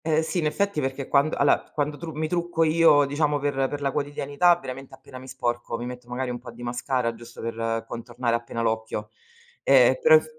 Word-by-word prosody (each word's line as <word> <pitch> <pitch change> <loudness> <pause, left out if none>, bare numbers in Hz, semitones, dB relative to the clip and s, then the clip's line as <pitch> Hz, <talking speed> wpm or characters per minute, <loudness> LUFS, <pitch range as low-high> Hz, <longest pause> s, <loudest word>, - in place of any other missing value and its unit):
Eh, 160 0 +2
sì, 170 +3 -2
in 155 - +1
effetti 200 0 0
perché 135 0 -3
quan 140 +2 +3
alla 140 0 +3
quando 145 0 -1
tru 165 +2 -7
mi 155 +1 -2
trucco 175 0 0
io, 155 -2 +5
diciamo 145 +1 +1
per 145 0 -1 0.2
per 145 0 -5
la 140 -1 0
quotidianità, 145 +4 +2
veramente 135 -2 -8
appena 130 -1 -12
mi 130 - -12
sporco, 120 -2 -3
mi 120 - -5
metto 125 0 -8
magari 125 +1 -3
un 120 - -5
po' 125 - -11
di 120 +1 -11
mascara 120 0 -1
giusto 115 +1 -13
per 115 0 -2
contornare 120 0 -2
appena 115 0 -4
l'occhio. 110 -1 -2 0.5
Eh, - - +5
però 480 0 +7
ef 470 - +4
135 Hz, 210 wpm, -25 LUFS, 120-150 Hz, 0.5 s, però